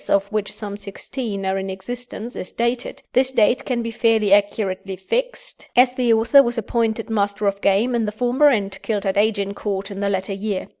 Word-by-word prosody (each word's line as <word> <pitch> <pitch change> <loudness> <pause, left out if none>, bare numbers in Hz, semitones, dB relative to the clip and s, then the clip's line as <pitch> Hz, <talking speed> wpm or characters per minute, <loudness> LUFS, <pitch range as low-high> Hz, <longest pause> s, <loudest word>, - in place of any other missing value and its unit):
of 195 0 +3
which 215 -2 -2
some 205 -2 -6
sixteen 205 +1 -5
are 190 0 0
in 190 0 -4
existence, 240 +4 -7
is - - -6
dated, 235 +1 -2
this 260 +1 +3
date 245 +2 +3
can 240 -3 -1
be 230 - -3
fairly 220 -3 +3
accurately 200 -2 +1
fixed, - - -3
as 250 +1 +6
the 250 -2 +1
author 230 +5 +6
was 240 -2 -2
appointed 225 0 -1
Master 205 -1 -1
of 200 0 0
Game 205 +6 +2
in 235 -2 +1
the 210 - -2
former 250 +6 +3
and 200 -6 -1
killed 205 -3 -2
at 195 - 0
Agincourt 200 -1 -1
in 195 - -6
the 200 0 0
latter 190 0 -2
year. 200 0 -3
215 Hz, 195 wpm, -21 LUFS, 200-240 Hz, -, as